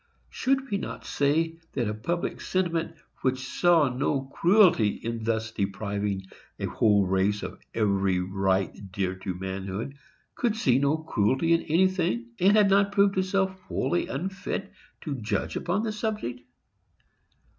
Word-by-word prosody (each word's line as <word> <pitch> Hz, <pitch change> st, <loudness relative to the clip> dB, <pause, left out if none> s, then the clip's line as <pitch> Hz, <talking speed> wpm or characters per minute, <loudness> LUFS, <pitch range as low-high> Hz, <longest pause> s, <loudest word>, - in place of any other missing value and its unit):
Should 270 Hz, -1 st, 0 dB
we 200 Hz, -, +1 dB
not -, -, -6 dB
say 160 Hz, +3 st, +1 dB
that 120 Hz, -5 st, -1 dB
a 105 Hz, -, -1 dB
public 170 Hz, +12 st, -3 dB
sentiment 170 Hz, -3 st, -1 dB, 0.3 s
which 130 Hz, 0 st, 0 dB
saw 170 Hz, -2 st, +4 dB
no 135 Hz, +2 st, 0 dB
cruelty 175 Hz, -, +5 dB
in 115 Hz, +2 st, -4 dB
thus 115 Hz, 0 st, -1 dB
depriving 100 Hz, -1 st, -2 dB, 0.4 s
a -, -, -2 dB
whole 105 Hz, -3 st, +3 dB
race 95 Hz, +2 st, +1 dB
of -, -, -6 dB, 0.2 s
every 100 Hz, -4 st, +2 dB
right 95 Hz, +1 st, -1 dB
dear 95 Hz, -1 st, -1 dB
to 95 Hz, -1 st, -4 dB
manhood 95 Hz, +6 st, -4 dB, 0.4 s
could 235 Hz, -3 st, 0 dB
see 130 Hz, -, +3 dB
no 140 Hz, +3 st, +2 dB
cruelty 155 Hz, +1 st, +1 dB
in 165 Hz, -, +3 dB
anything, 165 Hz, -9 st, +1 dB
and 200 Hz, +4 st, +5 dB
had 200 Hz, -1 st, +4 dB
proved 200 Hz, -1 st, +3 dB
itself 190 Hz, 0 st, +1 dB, 0.2 s
wholly 175 Hz, -, 0 dB
unfit 190 Hz, +5 st, -4 dB, 0.3 s
to 140 Hz, -6 st, -4 dB
judge 105 Hz, -, -2 dB
upon 185 Hz, +5 st, -1 dB
the 220 Hz, -, -1 dB
subject? 210 Hz, -, -3 dB
135 Hz, 140 wpm, -27 LUFS, -, 0.4 s, cruelty